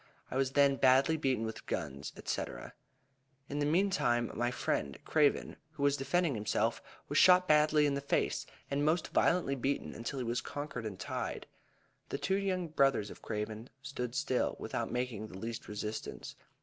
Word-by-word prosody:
I - - -4
was 135 0 +1
then 140 -1 +4
badly 135 +4 +5
beaten 130 -7 0
with 110 - -6
guns, 70 -5 -3
&c. - - 0 1.1
In 145 - -2
the 145 - +1
meantime, 150 - +2
my 120 +2 0
friend 70 - -1
Craven, 150 -3 +2 0.2
who 145 -2 -4
was 140 0 +4
defending 145 +4 +1
himself, 105 -2 0 0.3
was - - +2
shot 180 0 +7
badly 150 -1 +5
in 145 - +2
the 140 - -1
face, 140 - 0 0.2
and 140 +1 +1
most 155 +3 +1
violently 170 -6 +2
beaten 135 +1 -1
until 120 +4 -5
he 125 - -2
was 120 +1 -1
conquered 140 -6 -5
and 95 -3 -7
tied. - - -4 0.6
The - - -2
two 190 0 0
young 185 -3 -1
brothers 135 -9 +2
of - - -12
Craven 110 +2 -4
stood 125 -3 -4
still, 125 - 0
without - - -3
making 125 -4 -2
the 95 - -10
least 115 +3 -5
resistance. 105 +1 -5
135 Hz, 170 wpm, -33 LUFS, 115-150 Hz, 1.1 s, shot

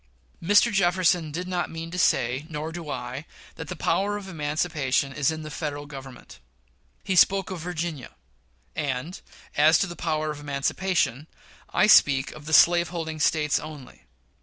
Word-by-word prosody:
Mr. 205 +6 +4
Jefferson 175 -4 +2
did 180 +4 -4
not 180 -1 -2
mean 165 0 -7
to 180 - -4
say, 130 -3 +1
nor 155 0 -4
do 165 -2 -7
I, 125 +2 -5 0.3
that - - -8
the - - -5
power 205 +1 0
of 200 -2 -9
emancipation 150 -4 -1
is 140 -1 +1
in 160 0 -4
the 155 - -8
Federal 145 -2 -4
Government. 135 -2 -11 0.6
He 190 - -1
spoke 195 +1 +4
of 185 - -5
Virginia; 165 - -5 0.6
and, 145 +3 -3 0.3
as 155 +2 +5
to - - +1
the 175 -2 -7
power 155 -2 -2
of 150 - -8
emancipation, 145 0 -1 0.4
I - - +3
speak 140 -9 +5
of 150 -1 -12
the - - -5
slave 170 +1 +6
holding 160 -2 -5
States 150 -1 +2
only. 150 - -11
155 Hz, 160 wpm, -25 LUFS, 145-175 Hz, 0.6 s, slave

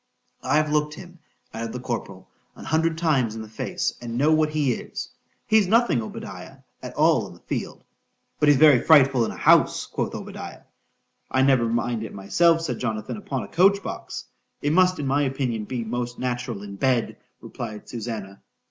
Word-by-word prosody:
—I've 150 +3 +1
look'd 150 0 0
him, 175 -1 -12 0.3
added 115 0 -5
the 125 - -4
corporal, 110 -6 -5 0.3
an - - -11
hundred 160 +1 +1
times 135 -10 +1
in 110 - -6
the - - -10
face,—and 120 - -4
know 145 +4 +3
what 155 -1 +3
he 150 -4 +1
is.—He's 215 - -2
nothing, 225 - +3
Obadiah, 110 - -8 0.2
at - - -8
all - - +3
in - - -12
the - - -18
field.—But 150 - -4
he's 145 - +6
very 145 -4 +7
frightful 135 -6 +5
in - - -4
a - - -9
house, - - +4
quoth - - -3
Obadiah.——I 130 - -7
never 130 -4 +3
mind 120 0 -1
it 110 - -8
myself, 165 - +3
said 165 - -3
Jonathan, 110 -3 -3
upon 135 - -4
a - - -8
coach 195 - +3
box.—It 145 +1 -6
must, 185 +1 +4
in 145 - -3
my 140 +2 +2
opinion, 130 -5 -1
be 120 +1 -3
most 120 +2 -4
natural 125 -4 -3
in 100 -1 -8
bed, 125 0 0 0.2
replied 110 -3 -7
_Susannah. 110 -4 -6
130 Hz, 165 wpm, -24 LUFS, 115-155 Hz, 0.3 s, very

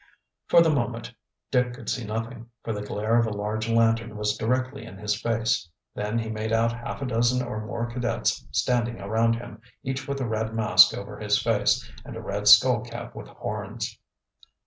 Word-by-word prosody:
For 170 - +7
the 160 - +3
moment 120 -3 -2 0.4
Dick 125 -1 +1
could - - -12
see 125 - -1
nothing, 115 +2 -5
for 115 - -2
the 105 - -4
glare 110 +3 +1
of 115 - +2
a - - -3
large 105 +2 -3
lantern 115 -1 +2
was 105 0 0
directly 130 +5 -1
in 95 - -10
his 105 +1 -1
face. 115 -6 0 0.2
Then 105 +2 -2
he 115 -1 -2
made 110 0 -3
out 115 +1 +3
half 120 +3 -6
a - - -1
dozen 125 +1 +1
or 110 -3 -4
more 105 +3 -3
cadets 120 +1 -1
standing 120 -1 0
around 110 +3 +1
him, 115 -2 -9 0.2
each 130 +1 -3
with 140 0 -2
a 130 - -1
red 110 0 -2
mask 95 -5 +6
over 105 +1 -8
his 105 0 +2
face, 110 -1 +1 0.2
and - - -9
a - - -5
red - - -3
skull - - +8
cap - - -8
with - - -9
horns. - - -5
115 Hz, 190 wpm, -26 LUFS, 110-120 Hz, 0.4 s, skull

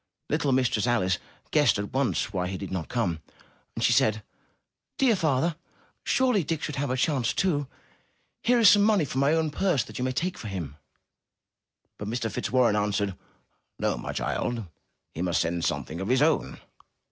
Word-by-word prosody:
Little 140 - +1
Mistress 125 -3 +1
Alice 95 -7 +1 0.3
guessed - - +4
at 100 0 -5
once 130 -5 0
why 90 -1 -1
he 95 +1 -4
did 95 - -7
not 90 -4 -4
come, 90 -10 -1 0.5
and - - -3
she - - +4
said: 110 -1 +2 0.7
''Dear 255 -5 +4
father, 155 -1 +1 0.5
surely 250 -8 +2
Dick 160 0 -3
should 150 - -4
have 140 0 -1
a 130 - 0
chance 130 -3 +1
too. 150 -7 0 0.7
Here 245 +1 +3
is 230 -3 +6
some 205 - +7
money 205 -6 +3
from 130 -1 -2
my 140 +3 +3
own 160 -2 0
purse 170 -4 +1
that - - -9
you - - -1
may 130 - 0
take 175 +7 -2
for 110 - -6
him.*' 85 -8 -5 1.2
But 105 - -5
Mr. 115 0 -2
Fitzwarren 120 -2 +2
answered, 100 -2 0 0.6
''No, - - +1
my - - -5
child! 115 -3 -2 0.5
He 80 - -5
must 90 -3 +1
send 85 0 -1
something 85 +4 -3
of 95 - -3
his 130 +4 +3
own." 150 - +1
125 Hz, 180 wpm, -27 LUFS, 100-155 Hz, 1.2 s, some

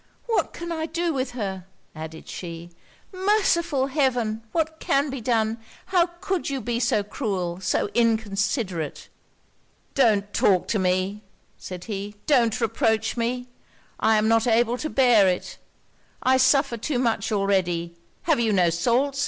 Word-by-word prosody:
'What 460 -2 0
can 340 0 -6
I 320 -1 -2
do 340 0 -1
with 260 -2 -2
her?' 190 -4 -4 0.3
added 160 0 -9
she. 170 -1 -7 0.4
'Merciful 370 -7 +2
Heaven, 250 -6 0
what 320 +1 -1
can 280 +1 +1
be 270 -2 -5
done? 225 -1 0 0.3
How 350 -2 +5
could 380 -5 -1
you 275 -1 -2
be 235 0 -2
so 225 -3 +1
cruel, 190 -6 -3
so 190 - 0
inconsiderate?' 205 - -1 0.8
'Don't 210 -7 +2
talk 185 -3 +3
to 215 - +1
me,' 185 +2 0 0.4
said 180 -1 -7
he 205 -1 -5
'don't 240 -6 +3
reproach 220 -1 +1
me! 245 +1 -2 0.5
I 220 0 +4
am 215 +1 +2
not 225 +1 +3
able 240 +1 +2
to 310 - -3
bear 245 -8 +5
it! 180 -1 -2 0.6
I 260 +1 +4
suffer 260 -1 +3
too 255 +4 -2
much 230 -5 0
already! 180 -4 0 0.3
Have 320 -6 +2
you 225 -2 +2
no 180 -4 +3
salts? 250 +11 +1
230 Hz, 145 wpm, -24 LUFS, 195-270 Hz, 0.8 s, How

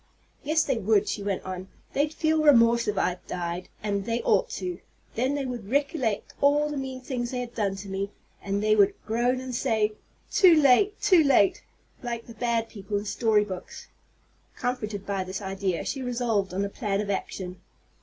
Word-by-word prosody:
"Yes, 310 +2 +2
they 270 -7 0
would," 210 0 +2
she 205 - -2
went 200 -2 -2
on. 185 0 -6 0.3
"They'd 290 +2 +1
feel 315 0 +1
remorse 235 -5 +5
if 210 -1 -1
I 180 0 0
died, 175 0 -4
and 200 -2 -1
they 230 +1 0
ought - - +3
to. 360 -1 -4 0.3
Then 255 +5 0
they 280 -2 -2
would 240 -6 -5
recollect 270 -5 0
all 295 +1 +3
the - - -3
mean 265 -1 -5
things 250 -2 -3
they've 245 -1 -4
done 200 -3 -1
to 195 +1 -8
me, 195 +1 -3 0.3
and 200 +1 -2
they 215 0 +4
would 205 -1 +4
groan, 240 +3 +1
and 260 -1 -6
say, 220 -2 +1 0.4
'Too 350 -5 +6
late 305 +10 +4
too 360 -5 +6
late!' 270 -8 +4 0.4
like 235 -2 -4
the 230 - -11
bad 230 -1 0
people 205 -2 -4
in 205 - -4
story 215 0 +2
books." 185 -3 -8 0.7
Comforted 215 -6 -3
by 195 -2 -1
this 185 +1 -5
idea, 195 -3 -2
she 270 - -3
resolved 235 -6 0
on 195 +2 -1
a - - -1
plan 200 -2 -2
of 205 -1 -1
action. 185 -1 -4
225 Hz, 185 wpm, -26 LUFS, 200-260 Hz, 0.7 s, Too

